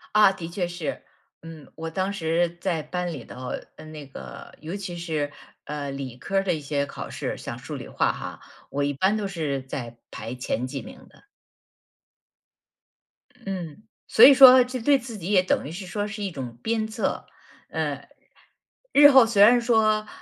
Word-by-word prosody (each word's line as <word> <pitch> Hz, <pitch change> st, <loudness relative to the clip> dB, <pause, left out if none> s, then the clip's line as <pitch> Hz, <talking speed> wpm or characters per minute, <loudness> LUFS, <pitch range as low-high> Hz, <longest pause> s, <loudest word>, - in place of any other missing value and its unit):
啊， 210 Hz, -2 st, +7 dB
的 175 Hz, -4 st, -7 dB
确 175 Hz, 0 st, -2 dB
是。 175 Hz, -4 st, -5 dB, 0.4 s
嗯， 160 Hz, -3 st, -12 dB
我 165 Hz, 0 st, -5 dB
当 190 Hz, +4 st, -2 dB
时 170 Hz, -2 st, -1 dB
在 175 Hz, -3 st, -1 dB
班 180 Hz, +2 st, -4 dB
里 135 Hz, -6 st, -7 dB
头 125 Hz, +2 st, -8 dB, 0.3 s
呃， -, -, -12 dB
那 155 Hz, -2 st, -10 dB
个， 65 Hz, -, -11 dB
尤 165 Hz, +4 st, -6 dB
其 190 Hz, -3 st, -6 dB
是， 155 Hz, -4 st, -3 dB, 0.3 s
呃， 145 Hz, -1 st, -5 dB
理 135 Hz, -3 st, -6 dB
科 195 Hz, +9 st, -3 dB
儿 195 Hz, -, +3 dB
的 190 Hz, -, 0 dB
一 160 Hz, -, -3 dB
些 140 Hz, -1 st, -2 dB
考 -, -, -8 dB
试， -, -, -4 dB
像 -, -, -7 dB
数 -, -, -7 dB
理 -, -, -8 dB
化 -, -, +1 dB
哈， -, -, -8 dB, 0.3 s
我 145 Hz, +1 st, -1 dB
一 145 Hz, -, 0 dB
般 190 Hz, +9 st, +1 dB
都 210 Hz, -2 st, -2 dB
是 155 Hz, -8 st, -3 dB
在 125 Hz, -3 st, -7 dB
排 115 Hz, +2 st, -7 dB
前 125 Hz, -1 st, -3 dB
几 135 Hz, +1 st, -5 dB
名 -, -, -13 dB
的。 -, -, -23 dB, 2.2 s
嗯， 185 Hz, -1 st, -6 dB, 0.2 s
所 225 Hz, -, +5 dB
以 280 Hz, -, +10 dB
说， 260 Hz, -1 st, +9 dB
这 250 Hz, +1 st, -5 dB
对 280 Hz, +4 st, +4 dB
自 240 Hz, -3 st, -8 dB
己 185 Hz, +1 st, -5 dB
也 185 Hz, -3 st, +5 dB
等 185 Hz, -, 0 dB
于 -, -, -7 dB
是 185 Hz, +3 st, -7 dB
说 205 Hz, +3 st, -3 dB
是 210 Hz, 0 st, -6 dB
一 195 Hz, -, -3 dB
种 125 Hz, -6 st, -7 dB
鞭 220 Hz, -1 st, -1 dB
策。 220 Hz, -, -3 dB, 0.4 s
呃， -, -, -3 dB, 0.8 s
日 290 Hz, 0 st, +8 dB
后 265 Hz, -3 st, +8 dB
虽 225 Hz, -3 st, +2 dB
然 240 Hz, +3 st, +6 dB
说， 215 Hz, -2 st, +2 dB
175 Hz, 200 characters per minute, -25 LUFS, 145-210 Hz, 2.2 s, 以